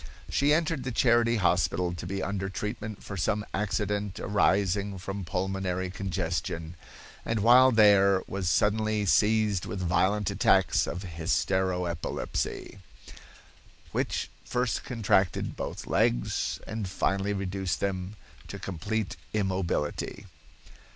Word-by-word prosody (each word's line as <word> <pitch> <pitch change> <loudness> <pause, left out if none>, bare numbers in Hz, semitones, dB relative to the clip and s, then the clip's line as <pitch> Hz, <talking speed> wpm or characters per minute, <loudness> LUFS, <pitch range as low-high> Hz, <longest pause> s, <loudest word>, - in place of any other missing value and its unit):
She 140 +1 +3
entered 160 -2 +1
the 125 - -3
Charity 120 -1 +3
hospital 90 -2 +1
to 85 0 -6
be 95 +1 -3
under 95 0 -2
treatment 105 +1 -5
for 100 - -6
some 105 +3 0
accident 105 0 -1
arising 100 0 +1
from 95 +1 -5
pulmonary 95 0 -2
congestion, 85 -3 -3 0.5
and 115 -2 -1
while 125 +4 +7
there 100 -4 +5
was 95 -2 -2
suddenly 105 +1 +1
seized 105 -1 +2
with 100 - -4
violent 95 +3 +1
attacks - - +3
of 90 - -4
hystero 90 +2 0
epilepsy, 85 +3 -4 1.1
which - - -2
first 125 -1 -1
contracted 100 -6 +1
both - - -5
legs, - - 0
and 110 -2 -4
finally 95 +2 0
reduced 95 -2 -2
them 95 0 -3 0.3
to - - -7
complete 100 +4 -3 0.2
immobility. 95 -7 -2
100 Hz, 115 wpm, -28 LUFS, 90-105 Hz, 1.1 s, while